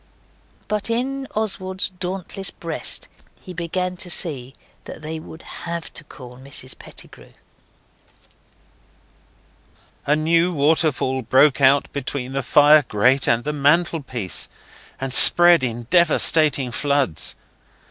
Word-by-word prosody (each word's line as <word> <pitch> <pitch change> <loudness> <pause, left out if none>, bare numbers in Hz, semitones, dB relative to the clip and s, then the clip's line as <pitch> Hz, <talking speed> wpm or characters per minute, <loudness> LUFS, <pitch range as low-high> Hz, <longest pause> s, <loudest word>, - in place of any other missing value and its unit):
But 210 +1 -3
in 265 +3 -3
Oswald's 190 -3 -2
dauntless 185 +2 -5
breast - - -6 0.3
he 185 - -11
began 180 +2 -4
to 180 -1 -5
see 135 -7 -4 0.3
that 155 - -11
they 160 +1 -6
would 160 +1 -13
HAVE 170 -1 -8
to - - -3
call 125 -4 -13
Mrs 130 -1 -7
Pettigrew. - - -14 2.7
A 150 - +3
new 165 +3 +1
waterfall 145 -3 +1
broke 135 +4 +3
out 135 +1 +4
between 135 -2 -5
the 135 - -2
fire 150 +3 +5
grate 130 +6 +1
and 115 0 +1
the 150 - -3
mantelpiece, 145 - 0 0.5
and 135 -1 -4
spread 175 +1 +8
in 120 -1 -4
devastating 155 -5 +3
floods. 140 - -1
150 Hz, 115 wpm, -20 LUFS, 130-175 Hz, 2.7 s, spread